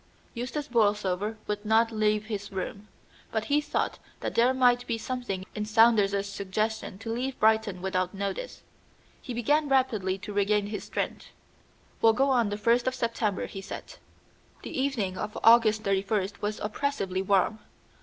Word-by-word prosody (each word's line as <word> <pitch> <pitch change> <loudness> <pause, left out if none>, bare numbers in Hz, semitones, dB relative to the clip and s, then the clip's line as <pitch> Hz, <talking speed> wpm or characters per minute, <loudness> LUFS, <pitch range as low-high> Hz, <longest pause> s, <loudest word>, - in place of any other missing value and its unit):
Eustace 250 +4 -4
Borlsover 210 -2 +1
would 210 0 -3
not 225 +1 +3
leave 215 -1 +1
his 205 -2 -5
room, 200 +2 -5 0.4
but 220 -1 -1
he 295 +1 +2
thought - - -2 0.2
that - - -3
there 240 +2 +4
might 245 -1 +3
be 230 - -1
something 225 -6 -4
in 210 - -3
Saunders's 210 -2 +4
suggestion 200 +1 -3
to 225 +2 -5
leave 255 +3 -3
Brighton 215 -4 +2
without 185 -1 0
notice. 200 - -4 0.6
He 255 - -7
began 290 +6 +2
rapidly 220 -8 +1
to 205 +2 -8
regain 205 +1 +2
his 205 0 -5
strength. - - -4 0.7
"We'll 225 0 +6
go 270 +4 +2
on 240 -5 +3
the 205 - -3
first 235 +3 +2
of 255 - +1
September," 230 -5 -1
he 195 - -7
said. 195 - -8 0.7
The - - -7
evening 245 -9 -1
of 210 - -4
August 225 -1 +6
31st 195 0 -1
was 210 +1 -2
oppressively 210 -5 -2
warm. 195 +2 +2
215 Hz, 155 wpm, -28 LUFS, 200-240 Hz, 0.7 s, We'll